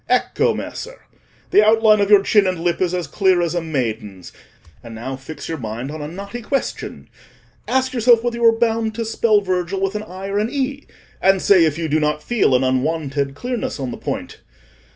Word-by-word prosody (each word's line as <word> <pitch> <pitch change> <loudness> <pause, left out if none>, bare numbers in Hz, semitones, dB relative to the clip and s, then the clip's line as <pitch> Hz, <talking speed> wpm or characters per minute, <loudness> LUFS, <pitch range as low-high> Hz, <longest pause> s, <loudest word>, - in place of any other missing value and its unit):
Ecco, - - +2
Messer! - - -7 0.5
the 210 - +6
outline 215 -1 +5
of 200 - +1
your 205 -2 +6
chin 205 -1 +3
and 185 -2 -1
lip 175 +1 0
is 180 -2 +1
as 180 -2 -2
clear 190 -3 +2
as 170 -1 0
a 175 - -1
maiden's; 110 - -4 0.5
and 115 -1 -9
now 130 +4 -5
fix 135 +4 -9
your 165 -2 -4
mind 115 +4 -5
on 155 0 -7
a 145 - -4
knotty 200 +8 -7
question—ask 260 +1 -4
yourself 235 -1 +4
whether 240 -1 -2
you 235 - -3
are 225 -1 +5
bound 225 -1 0
to 230 0 -3
spell 220 -1 +2
Virgil 185 0 -2
with 195 0 -1
an 210 - -3
i 190 -1 -9
or 200 +1 -1
an 215 +2 0
e, 280 0 -3 0.3
and 190 0 +4
say 185 -3 +5
if 155 -1 0
you 165 -1 -2
do 155 +1 +1
not 150 0 -1
feel 225 - +2
an 125 - +2
unwonted 140 +1 -1
clearness 245 - -4
on 130 -3 -3
the - - -5
point. - - -5
185 Hz, 205 wpm, -20 LUFS, 150-225 Hz, 0.5 s, the